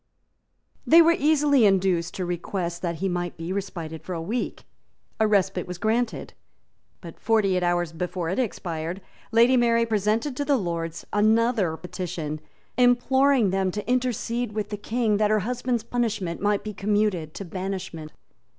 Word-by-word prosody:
They 330 Hz, -, +8 dB
were 335 Hz, +1 st, +4 dB
easily 290 Hz, -3 st, +3 dB
induced 190 Hz, -4 st, +2 dB
to 185 Hz, -, -3 dB
request 175 Hz, 0 st, -3 dB
that 170 Hz, -2 st, -2 dB
he 190 Hz, +5 st, -2 dB
might 175 Hz, -1 st, -3 dB
be 165 Hz, +3 st, -4 dB
respited 170 Hz, -5 st, -5 dB
for 185 Hz, -, -5 dB
a -, -, -3 dB
week. 215 Hz, +10 st, -3 dB, 0.6 s
A 220 Hz, -, +4 dB
respite 195 Hz, -3 st, +1 dB
was 180 Hz, -1 st, -6 dB
granted; 225 Hz, +3 st, -1 dB, 0.7 s
but, 170 Hz, -3 st, -11 dB
forty 215 Hz, -4 st, +2 dB
eight 180 Hz, -, +1 dB
hours 175 Hz, -2 st, 0 dB
before 180 Hz, +1 st, -3 dB
it 190 Hz, -, -1 dB
expired, 170 Hz, -7 st, -3 dB, 0.3 s
Lady 235 Hz, +3 st, +5 dB
Mary 230 Hz, -1 st, +3 dB
presented 220 Hz, +5 st, 0 dB
to 285 Hz, -, 0 dB
the 285 Hz, -1 st, +2 dB
Lords 165 Hz, -5 st, -4 dB
another 215 Hz, -4 st, +2 dB
petition, 170 Hz, -4 st, -5 dB, 0.4 s
imploring 250 Hz, -1 st, +4 dB
them 190 Hz, 0 st, +1 dB
to 210 Hz, +3 st, -5 dB
intercede 245 Hz, -2 st, -1 dB
with 210 Hz, -1 st, -3 dB
the 210 Hz, -, -3 dB
King 220 Hz, 0 st, 0 dB
that 210 Hz, 0 st, +2 dB
her 215 Hz, -1 st, +2 dB
husband's 245 Hz, +1 st, -2 dB
punishment 220 Hz, -8 st, -2 dB
might 205 Hz, 0 st, +1 dB
be 215 Hz, -, -5 dB
commuted 200 Hz, -5 st, 0 dB
to 200 Hz, -, -6 dB
banishment. 185 Hz, -3 st, -5 dB
200 Hz, 160 wpm, -25 LUFS, 175-230 Hz, 0.7 s, They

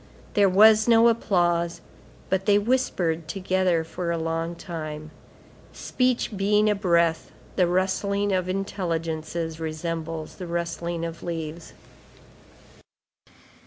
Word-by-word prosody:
There 200 Hz, -1 st, +4 dB
was 215 Hz, +3 st, +6 dB
no 230 Hz, 0 st, +6 dB
applause; 175 Hz, -6 st, +1 dB, 0.5 s
but 190 Hz, +1 st, 0 dB
they 205 Hz, -1 st, +5 dB
whispered 185 Hz, -8 st, 0 dB
together 185 Hz, -2 st, 0 dB
for 170 Hz, +2 st, -5 dB
a 170 Hz, -, 0 dB
long 165 Hz, +1 st, -2 dB
time. 155 Hz, -3 st, -7 dB, 0.6 s
Speech 250 Hz, -3 st, -1 dB
being 210 Hz, +2 st, +2 dB
a -, -, +3 dB
breath, 170 Hz, -5 st, +1 dB, 0.3 s
the 180 Hz, -2 st, +3 dB
rustling 200 Hz, +3 st, 0 dB
of 185 Hz, -1 st, 0 dB
intelligences 165 Hz, -4 st, -3 dB
resembles 160 Hz, 0 st, -4 dB
the 180 Hz, -, -6 dB
rustling 170 Hz, 0 st, -3 dB
of 165 Hz, 0 st, -7 dB
leaves. 165 Hz, -1 st, -6 dB
175 Hz, 110 wpm, -25 LUFS, 165-200 Hz, 0.6 s, was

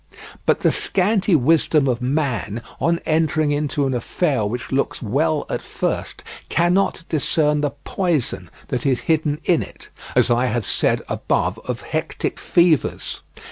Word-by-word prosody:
But -, -, +3 dB
the -, -, +4 dB
scanty 195 Hz, -1 st, +2 dB
wisdom 150 Hz, 0 st, +3 dB
of 125 Hz, -1 st, 0 dB
man, 125 Hz, -5 st, -1 dB, 0.2 s
on 170 Hz, 0 st, +2 dB
entering 155 Hz, -1 st, +1 dB
into 145 Hz, -1 st, 0 dB
an 135 Hz, -, 0 dB
affair 130 Hz, +1 st, 0 dB
which 120 Hz, +3 st, -5 dB
looks 135 Hz, +1 st, 0 dB
well 145 Hz, +7 st, 0 dB
at -, -, -3 dB
first, -, -, -3 dB, 0.3 s
cannot 175 Hz, +1 st, +2 dB
discern 150 Hz, -1 st, +1 dB
the 145 Hz, -, +1 dB
poison 175 Hz, -9 st, -1 dB, 0.2 s
that 125 Hz, -, -2 dB
is 135 Hz, -3 st, +1 dB
hidden 155 Hz, -2 st, 0 dB
in 170 Hz, -, +3 dB
it, -, -, -10 dB, 0.3 s
as -, -, +4 dB
I 120 Hz, +2 st, +3 dB
have 120 Hz, -4 st, -1 dB
said -, -, +1 dB
above 90 Hz, +6 st, -1 dB
of 125 Hz, -1 st, -3 dB
hectic 155 Hz, 0 st, -3 dB
fevers. 170 Hz, -4 st, +1 dB
150 Hz, 145 wpm, -21 LUFS, 125-165 Hz, 0.3 s, the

